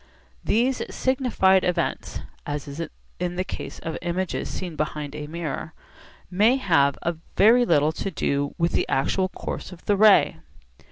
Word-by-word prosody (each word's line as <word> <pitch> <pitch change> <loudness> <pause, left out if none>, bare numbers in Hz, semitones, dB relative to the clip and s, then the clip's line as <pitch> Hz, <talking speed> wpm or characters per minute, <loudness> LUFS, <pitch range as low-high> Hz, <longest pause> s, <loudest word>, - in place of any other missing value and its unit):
These 250 +4 +1
signified 245 -8 +2
events 175 -2 -1 0.2
(as 145 0 -4
is 140 +3 -6 0.4
the 180 +1 -1
case - - -7
of 160 - -5
images 175 +1 -2
seen 180 -4 -5
behind 150 -1 -3
a 150 -1 -6
mirror) 160 -1 -5 0.6
may 215 +7 +4
have 155 - +2 0.4
very 240 +4 +6
little 150 +1 +4
to 180 - -4
do 140 -5 -1
with 170 -1 +1
the - - 0
actual 185 +8 +1
course - - -6
of 180 -1 -13
the 205 - +3
ray. 205 - +5
175 Hz, 145 wpm, -24 LUFS, 150-200 Hz, 0.6 s, very